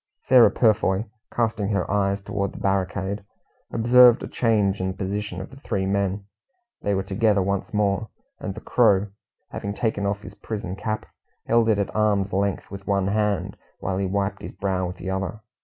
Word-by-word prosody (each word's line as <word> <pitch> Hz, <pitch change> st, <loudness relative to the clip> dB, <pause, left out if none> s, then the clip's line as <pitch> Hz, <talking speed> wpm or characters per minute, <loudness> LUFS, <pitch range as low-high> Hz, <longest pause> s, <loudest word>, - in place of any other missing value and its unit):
Sarah 125 Hz, -2 st, +7 dB
Purfoy, 105 Hz, -3 st, +2 dB, 0.3 s
casting 110 Hz, -4 st, 0 dB
her 100 Hz, -2 st, 0 dB
eyes 100 Hz, -1 st, +1 dB
toward 100 Hz, -1 st, -3 dB
the -, -, -10 dB
barricade, 95 Hz, +1 st, -1 dB, 0.5 s
observed 120 Hz, +1 st, +6 dB
a -, -, -4 dB
change 105 Hz, -5 st, +1 dB
in 95 Hz, -, 0 dB
the 95 Hz, -, -4 dB
position 100 Hz, -1 st, -3 dB
of 95 Hz, -, -8 dB
the 135 Hz, -, -12 dB
three 95 Hz, -8 st, -2 dB
men. 100 Hz, 0 st, -1 dB, 0.6 s
They 100 Hz, -1 st, 0 dB
were 95 Hz, -, 0 dB
together 100 Hz, 0 st, +2 dB
once 100 Hz, 0 st, -2 dB
more, 105 Hz, 0 st, 0 dB, 0.3 s
and 95 Hz, -, -5 dB
the -, -, -8 dB
Crow, 105 Hz, -4 st, +3 dB, 0.4 s
having 100 Hz, 0 st, -4 dB
taken 100 Hz, -3 st, -1 dB
off 100 Hz, 0 st, -2 dB
his 105 Hz, -, -9 dB
prison 100 Hz, -4 st, -5 dB
cap, 110 Hz, +2 st, -3 dB, 0.4 s
held 115 Hz, 0 st, +3 dB
it 110 Hz, -, +3 dB
at 100 Hz, -, -2 dB
arm's 100 Hz, -3 st, +1 dB
length 100 Hz, 0 st, -1 dB
with 100 Hz, -1 st, -9 dB
one 100 Hz, -1 st, +1 dB
hand, 105 Hz, -1 st, 0 dB, 0.2 s
while 95 Hz, +1 st, -2 dB
he 100 Hz, -, 0 dB
wiped 100 Hz, +1 st, -1 dB
his -, -, -7 dB
brow 95 Hz, -2 st, -1 dB
with 90 Hz, +1 st, -7 dB
the 95 Hz, -, -4 dB
other. 95 Hz, +3 st, -3 dB
100 Hz, 185 wpm, -24 LUFS, 95-105 Hz, 0.6 s, Sarah